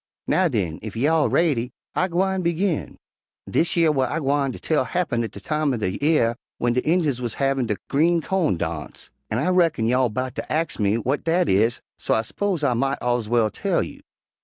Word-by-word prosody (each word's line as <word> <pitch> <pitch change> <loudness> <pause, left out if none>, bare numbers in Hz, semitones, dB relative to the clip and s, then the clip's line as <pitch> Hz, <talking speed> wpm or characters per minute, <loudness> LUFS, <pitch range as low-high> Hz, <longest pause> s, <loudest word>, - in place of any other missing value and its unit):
Now, 185 -1 +3
den, 95 - -2
ef 110 -1 -7
y'all 150 +6 +2
raidy, 130 -8 +1 0.2
I 185 - +1
gwine 190 +2 0
begin. 170 0 -1 0.5
"Dish 170 +1 +1
yer 165 -2 +5
w'at 135 -4 +1
I - - -2
gwine 140 -2 +1
tell 155 +1 0
happen 130 -6 -1
at 115 - -3
de - - -10
time 150 -4 0
er - - -3
de 95 -4 -2
'ear 140 -6 +2 0.2
w'en 120 0 +1
de 125 - +1
Injuns 155 -6 +1
wuz 120 -2 -3
havin' 135 -3 0
der 105 - -1
green 165 +4 +3
cawn 170 - 0
darnse, 80 -2 -6 0.2
an' 110 - -1
I 150 +9 +1
reckon 170 -10 +2
you 125 +3 +2
all 130 -2 +2
'bout 130 +3 -3
ter - - -5
ax 160 -3 -1
me 100 0 +2
w'at 130 +5 -1
dat 170 +1 +2
is, 110 +5 +2 0.2
so - - +1
I 110 - +1
s'pose 185 - -2
I 135 -4 +3
mought 135 +3 0
ez 120 -3 0
well 115 -3 +2
tell - - 0
you. - - -9
135 Hz, 210 wpm, -23 LUFS, 115-165 Hz, 0.5 s, yer